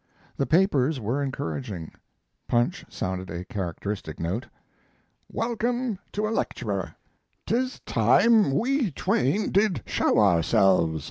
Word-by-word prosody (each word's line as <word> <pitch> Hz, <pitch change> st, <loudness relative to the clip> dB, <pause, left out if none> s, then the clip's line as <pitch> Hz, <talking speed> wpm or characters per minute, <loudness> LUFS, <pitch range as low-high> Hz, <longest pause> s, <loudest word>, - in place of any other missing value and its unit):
The 140 Hz, -, -1 dB
papers 155 Hz, -5 st, +3 dB
were 120 Hz, +6 st, -1 dB
encouraging; 130 Hz, -, -4 dB, 0.6 s
Punch 120 Hz, +11 st, +1 dB
sounded 95 Hz, 0 st, -4 dB
a 85 Hz, +2 st, -5 dB
characteristic 95 Hz, -2 st, -5 dB
note: 95 Hz, +10 st, -3 dB, 0.8 s
WELCOME 235 Hz, -1 st, -1 dB
TO 210 Hz, +1 st, -1 dB
A -, -, -2 dB
LECTURER -, -, -3 dB, 0.5 s
"'Tis 255 Hz, +3 st, -1 dB
time 225 Hz, -9 st, +4 dB
we 260 Hz, -1 st, +1 dB
Twain 150 Hz, -, 0 dB
did 195 Hz, -, +2 dB
show -, -, +1 dB
ourselves." 85 Hz, -3 st, +3 dB
135 Hz, 110 wpm, -26 LUFS, -, 0.8 s, time